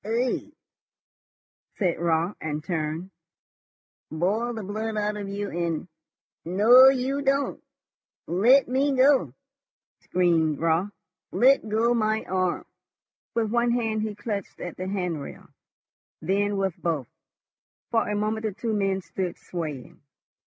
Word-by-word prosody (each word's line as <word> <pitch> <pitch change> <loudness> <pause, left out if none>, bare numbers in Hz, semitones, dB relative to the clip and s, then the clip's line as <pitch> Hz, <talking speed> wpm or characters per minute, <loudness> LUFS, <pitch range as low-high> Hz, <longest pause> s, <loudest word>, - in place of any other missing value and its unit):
"Eigh?" 235 +4 -1 1.3
said 180 -5 0
Raut, 170 +3 +1
and 150 -1 -3
turned. 165 +2 -3 1.0
"Boil 200 +9 0
the 220 - -5
blood 215 +2 -3
out 210 0 0
of 205 -1 -5
you 200 0 -4
in... 170 0 -2 0.6
No, 230 +9 +7
you 270 +1 0
don't!" 275 0 0 0.6
"Let 235 +11 +4
me 275 +3 +1
go!" 255 - +4 0.6
screamed 165 -4 +1
Raut. 165 +4 +1 0.4
"Let 260 -3 +4
go 225 +3 +2
my 220 -1 +1
arm!" 185 -1 -1 0.7
With 225 -2 0
one 240 0 +2
hand 225 -3 0
he 215 -1 -3
clutched 205 -2 -5
at 175 - -6
the 185 - -5
hand 180 -6 -2
rail, - - -10 0.7
then 200 +1 0
with 195 -3 -1
both. 160 -6 -1 0.9
For 225 -2 +1
a 210 - -1
moment 215 +1 -1
the 210 - -4
two 225 +2 -3
men 195 -2 0
stood 180 -1 -4
swaying. 155 -7 -7
205 Hz, 130 wpm, -26 LUFS, 175-225 Hz, 1.3 s, No